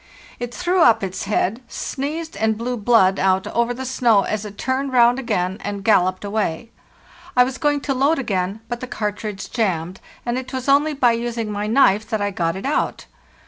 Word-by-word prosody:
It 245 0 -4
threw 360 +6 0
up 230 -8 +5
its 190 0 -4
head, 210 +3 0
sneezed, 310 +7 -4
and 220 -1 +1
blew 245 +2 -2
blood 205 -4 +3
out 190 0 +2
over 235 +1 0
the 260 +2 -5
snow 235 -5 +3
as 215 0 -3
it 205 -1 -9
turned 265 +1 -1
round 245 +1 +5
again 190 -7 -1
and 200 -1 -4
galloped 185 -2 +2
away. 210 0 -2 0.7
I 250 - +8
was 260 +1 -4
going 290 -1 +1
to 275 - -1
load 280 +5 +2
again, 200 -4 -2
but 240 0 -4
the 255 - -6
cartridge 210 -3 -4
jammed, 185 -6 -1 0.2
and 240 +1 -1
it 260 +1 -9
was 260 0 -4
only 290 +2 +3
by 250 -3 +4
using 230 -1 -2
my 205 0 -3
knife 220 -3 +3
that 220 -2 -1
I 205 0 -1
got 170 -3 -1
it 190 - -6
out. 285 - -1
230 Hz, 195 wpm, -21 LUFS, 200-260 Hz, 0.7 s, I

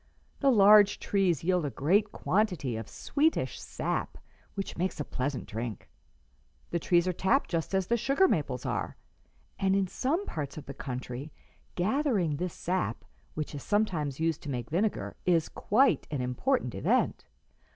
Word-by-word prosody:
The 275 - +4
large 205 -3 +7
trees 185 -7 +1
yield 180 0 +2
a 145 - -1
great 195 +11 +2
quantity 180 - 0
of 110 -1 -6
sweetish 310 +3 0
sap, - - -3 0.4
which 195 -1 -4
makes 185 0 -2
a 150 - -2
pleasant 130 +1 -3
drink. 115 -1 -6 0.8
The 170 - 0
trees 175 +1 +2
are 185 - +1
tapped 190 +10 +1
just 165 +2 -1
as 190 -1 +1
the 235 +5 +1
sugar 275 - +3
maples - - -1
are, - - -2 0.6
and 195 -1 +2
in 195 -1 +2
some 290 - -1
parts 145 -3 -5
of 155 - -7
the 140 - -7
country 130 +2 -6 0.4
gathering 200 - +1
this 180 +1 -3
sap, 185 +1 -2 0.3
which 155 -1 -4
is 145 - -5
sometimes 165 -10 0
used 165 -1 0
to 145 - -7
make 125 -2 -4
vinegar, 200 +6 -1
is 170 -3 +3
quite 260 +7 +2
an 145 - -3
important 125 - 0
event." - - 0
180 Hz, 160 wpm, -29 LUFS, 145-210 Hz, 0.8 s, large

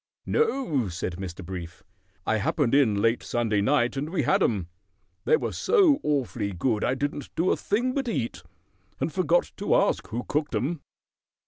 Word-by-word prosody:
"No," 265 - +1
said 85 0 -4
Mr. 95 -1 -7
Brief. 90 -1 -7 0.4
"I 110 - +2
happened 120 +5 0
in 110 -8 +3
late 115 +1 +2
Sunday 110 -4 0
night, 125 +3 +2
and 140 +3 -3
we 180 - 0
had 195 - +2
'em. 100 - +1 0.6
They 465 - +5
were - - -3
so 370 -11 +4
awfully 125 -8 -1
good 105 +4 0
I 130 - +1
didn't 145 +1 -3
do 175 +3 +2
a - - +3
thing 245 +5 0
but 270 -2 -2
eat, 120 - -2 0.6
and 165 - -2
forgot 175 -2 +2
to 205 - +1
ask 200 - +2
who 120 +2 -4
cooked 150 0 -1
'em." 155 +3 -1
135 Hz, 175 wpm, -26 LUFS, -, 0.6 s, They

